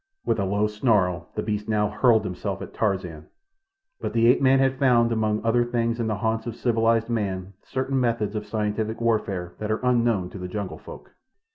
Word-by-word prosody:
With - - +1
a 100 - +1
low 100 +2 +1
snarl 105 - +1
the - - -2
beast 105 0 -3
now 105 -1 +2
hurled 110 +1 +3
himself 90 - -4
at - - -10
Tarzan, 95 -7 -2 0.7
but - - -4
the 115 0 +3
ape 125 - +4
man 135 0 +5
had 135 0 +1
found, 120 -4 +4
among 110 -1 0
other 120 +1 +3
things 115 -1 -1
in 115 - -1
the 110 - 0
haunts 110 +2 -1
of 115 - -4
civilized 115 -1 +1
man, 100 -5 -3
certain 130 +1 -2
methods 115 -4 0
of 105 0 -4
scientific 110 +1 -2
warfare 100 -6 -1
that 110 - -4
are 110 +3 -1
unknown 115 -7 +2
to 100 - -8
the 90 - -5
jungle 100 0 -5
folk. - - -12
110 Hz, 195 wpm, -25 LUFS, 105-115 Hz, 0.7 s, man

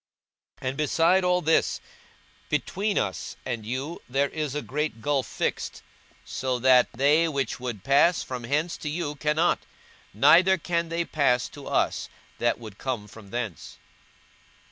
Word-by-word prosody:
42:016:026 - - -3
And 135 - -6
beside 165 +5 +3
all 180 0 +2
this, 160 0 +2 0.7
between 200 +2 -1
us - - -2
and 115 -4 -4
you 135 +8 -4
there 140 +2 +1
is 150 -3 -3
a 150 - -2
great 150 -4 -2
gulf 140 0 0
fixed: - - -3 0.4
so 130 0 -2
that 125 0 +5
they 145 +6 +3
which 140 -4 -2
would 120 -6 -5
pass 145 +6 +4
from 125 -2 -6
hence 150 +7 0
to 150 - -5
you 150 -1 -2
cannot; 150 +3 +1 0.5
neither 175 - +6
can 170 0 -1
they 170 +1 -1
pass 125 -7 +2
to 145 -2 -11
us, - - 0 0.3
that 120 0 +2
would 110 -4 -11
come 120 -6 -3
from 105 -1 -13
thence. 115 -5 -5
140 Hz, 150 wpm, -26 LUFS, 125-165 Hz, 0.7 s, neither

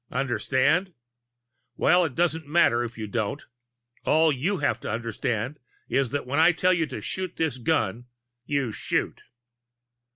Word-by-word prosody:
Understand? 140 +7 +1 0.8
Well, 180 0 +4
it 140 -6 -5
doesn't 165 -3 0
matter 145 -7 +3
if 115 -1 -7
you 110 - -4
don't. 105 0 -3 0.6
All 160 0 +4
you 160 +9 -1
have 145 -3 0
to - - -6
understand 115 +3 -3 0.3
is 135 -2 +1
that 145 +4 -3
when 140 +4 -1
I 170 +2 +6
tell 185 +2 +3
you 165 -3 0
to - - -6
shoot 185 -1 -4
this 155 -6 -1
gun, 120 -5 0 0.4
you 140 -3 -1
shoot." - - -2
140 Hz, 150 wpm, -26 LUFS, 120-165 Hz, 0.8 s, I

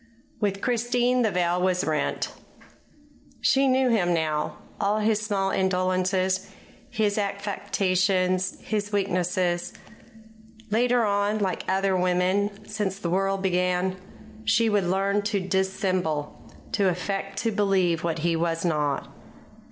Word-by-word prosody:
With 200 -2 -1
Christine 245 +1 +1
the 225 - +3
veil 180 -1 0
was 185 0 +1
rent. 155 -1 -1 1.1
She 275 0 +3
knew 260 0 +3
him 175 -6 +2
now 155 -2 -1 0.2
all 205 +2 +1
his 215 0 +2
small 195 -3 0
indolences, 185 0 0 0.4
his 210 -1 0
affectations, 190 -2 0
his 210 -1 -2
weaknesses. 180 -3 0 1.0
Later 240 +1 +3
on, 205 +1 +1
like 195 -3 -1
other 190 0 +2
women 185 +3 0
since 205 -3 -2
the 175 -4 -3
world 195 +1 0
began, 180 0 +1 0.5
she 225 +1 +3
would 205 -3 +2
learn 195 +2 +1
to 205 0 -1
dissemble, 185 -5 -2 0.2
to 195 -2 +2
affect 195 +2 -3
to 230 - +1
believe 195 -5 +2
him - - -5
what 165 -1 -1
he 170 -1 +2
was 165 +1 -1
not. 150 -4 0
190 Hz, 125 wpm, -25 LUFS, 180-205 Hz, 1.1 s, the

